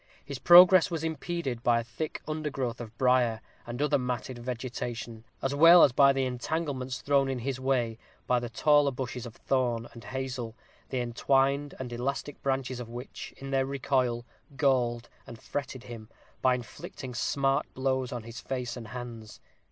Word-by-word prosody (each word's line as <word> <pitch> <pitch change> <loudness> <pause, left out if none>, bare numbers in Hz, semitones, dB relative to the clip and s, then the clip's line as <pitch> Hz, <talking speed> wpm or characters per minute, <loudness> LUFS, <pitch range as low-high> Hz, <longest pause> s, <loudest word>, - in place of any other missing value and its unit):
His 140 -2 -6
progress 180 +1 +8
was 165 -3 -3
impeded 160 -5 -3
by 120 -1 +3
a - - -3
thick 155 +6 -5
undergrowth 135 -6 -3
of 115 -1 -10
brier, 125 -3 +3 0.3
and 120 +1 -5
other 150 -1 +2
matted 125 0 -3
vegetation, 120 -2 -5 0.2
as 135 - 0
well 165 +4 +8
as - - +6
by 140 +2 +6
the 135 -1 0
entanglements 130 0 -3
thrown 140 -1 +2
in 135 - -1
his 130 +2 -3
way 125 -4 0 0.3
by 125 -1 +2
the 120 0 -5
taller 145 +4 +4
bushes 125 -2 -5
of 115 - -12
thorn 120 -3 0
and 115 -3 -12
hazel, 125 -3 -4 0.3
the 130 -2 -1
entwined 135 +4 +1
and 125 -2 -6
elastic 135 +4 -3
branches 130 -2 -1
of 120 -2 -7
which, 120 +2 -8
in 135 0 -7
their 135 -1 +1
recoil, 130 -3 0 0.3
galled 120 -5 +1 0.2
and 115 - -10
fretted 130 -1 -5
him, 115 -3 -9 0.3
by 130 -1 +4
inflicting 125 +1 -8
smart 135 +3 0
blows 130 -1 -1
on 120 -2 -5
his 115 0 -8
face 125 -2 -4
and 120 -3 -8
hands. 115 -2 -8
130 Hz, 165 wpm, -29 LUFS, 120-135 Hz, 0.3 s, progress